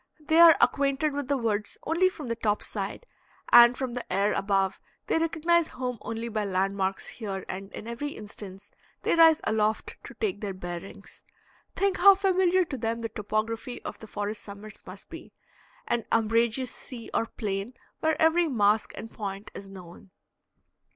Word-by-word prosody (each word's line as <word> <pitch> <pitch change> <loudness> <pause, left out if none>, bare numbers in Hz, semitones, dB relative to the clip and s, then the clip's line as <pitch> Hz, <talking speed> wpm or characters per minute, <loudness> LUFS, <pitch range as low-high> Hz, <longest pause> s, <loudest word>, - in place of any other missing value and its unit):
They 315 +2 +2
are 335 -1 +9
acquainted 280 +2 +2
with 285 -2 -3
the 280 0 +1
woods 220 -3 -1
only 340 +4 +2
from 315 -5 -9
the 230 -1 -2
top 210 -2 -1
side, - - -4 0.5
and 240 +1 +8
from 260 -3 -3
the 245 -1 -6
air 200 +3 +2
above 195 -1 0 0.3
they - - +1
recognize 330 +1 +2
home 250 -3 -4
only 230 +1 -4
by 215 -2 -2
land 195 0 0
marks 195 0 -2
here, 195 -5 -5
and 195 +2 -6
in 215 - -8
every 260 +5 -4
instance 205 -2 -9 0.3
they - - +2
rise 325 -2 +6
aloft 215 0 0
to - - -10
take 410 - -2
their 200 -3 -4
bearings. 175 +2 -8 0.5
Think 390 -1 +1
how 395 +2 +8
familiar 375 -1 +2
to 280 -4 -5
them 230 +1 -2
the 225 - -3
topography 220 +4 -3
of - - -7
the 220 - -11
forest 210 +1 -4
summits 205 +1 -11
must - - -10
be - - -11 0.5
an 235 -1 0
umbrageous 230 +3 +1
sea 240 -3 -10
or 230 - +1
plain 205 +2 -4 0.2
where 315 -1 0
every 325 +2 +4
mask 215 -5 +2
and 225 - -8
point 200 -1 -6
is 195 - -9
known. 185 -1 -12
230 Hz, 170 wpm, -27 LUFS, 205-290 Hz, 0.5 s, are